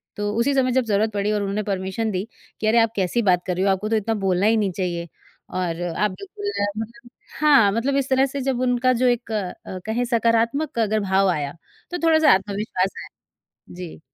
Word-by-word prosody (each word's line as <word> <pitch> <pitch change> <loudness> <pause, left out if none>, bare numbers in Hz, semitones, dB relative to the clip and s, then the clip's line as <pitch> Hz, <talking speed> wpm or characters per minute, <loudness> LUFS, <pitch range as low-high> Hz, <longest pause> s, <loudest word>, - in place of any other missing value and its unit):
तो 205 0 -2
उसी 275 +4 +2
समय 255 -2 +2
जब 260 +1 +2
ज़रूरत 215 +1 +1
पड़ी 205 +1 0
और 210 - 0
उन्होंने 200 +1 -2
परमिशन 195 +2 -2
दी 185 0 -2 0.4
कि, 215 - -1
"अरे, 225 - +4
आप 225 0 +2
कैसी 195 +5 0
बात 180 -4 +2
कर 180 - 0
रहे 185 +2 0
हो? 195 - +4
आपको 200 +3 -1
तो 225 - +2
इतना 220 +1 0
बोलना 185 +1 +2
ही 225 +1 +4
नहीं 200 -3 +1
चाहिए।" 175 -2 -3 0.4
और 175 -2 -3
आप 180 +4 0
बिल्कुल 410 - -6 0.3
मतलब 235 +2 -10 0.3
हाँ, 280 -9 +5
मतलब 250 +6 0
इस 270 -1 -1
तरह 265 +1 +4
से 275 +1 -4
जब 260 -2 -1
उनका 255 0 +2
जो 250 +1 +2
एक 240 -1 0
अ, 190 -2 -4
कहे 230 +3 -1
सकारात्मक 235 +4 +1
अगर 215 -1 +2
भाव 195 -1 +2
आया 145 -4 -1 0.4
तो 355 - -2
थोड़ा-सा 315 -1 +5
आत्मविश्वास 195 -1 -1
आया। - - -11 0.6
जी। 180 -4 -8
215 Hz, 210 wpm, -22 LUFS, 190-245 Hz, 0.6 s, हाँ